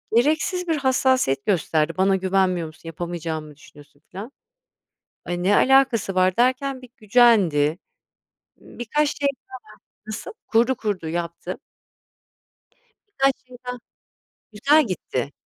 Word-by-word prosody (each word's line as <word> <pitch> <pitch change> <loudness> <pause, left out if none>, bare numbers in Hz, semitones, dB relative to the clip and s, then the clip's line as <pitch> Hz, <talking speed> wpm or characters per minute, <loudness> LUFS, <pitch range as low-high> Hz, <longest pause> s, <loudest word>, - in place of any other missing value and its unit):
gereksiz 315 +8 +1
bir 320 -2 +1
hassasiyet 260 - +1
gösterdi. 165 -4 +1
"Bana 190 +1 +3
güvenmiyor 185 -3 +1
musun? 155 - -15
Yapamayacağımı 165 -2 -5
mı 150 - -14
düşünüyorsun?" 145 0 -18
Filan. 210 +8 -8 0.9
"Ay, 175 0 -3
ne 205 +3 +3
alakası 265 -7 +3
var?" 185 0 +2
derken, 260 +2 +1
bir 255 - -12
gücendi. 200 - +3 0.8
Birkaç 290 +6 -2
şey 285 -1 +1
daha - - -52 0.6
Nasıl? 215 - -6 0.2
Kurdu, 235 +3 +2
kurdu, 205 -8 -3
yaptı. 170 0 -4 1.5
Birkaç 270 -7 +2
şey 250 -1 -13
daha 250 - -4 0.7
Güzel 280 +6 +3
gitti. 140 -6 -3
205 Hz, 115 wpm, -23 LUFS, 170-260 Hz, 1.5 s, Bana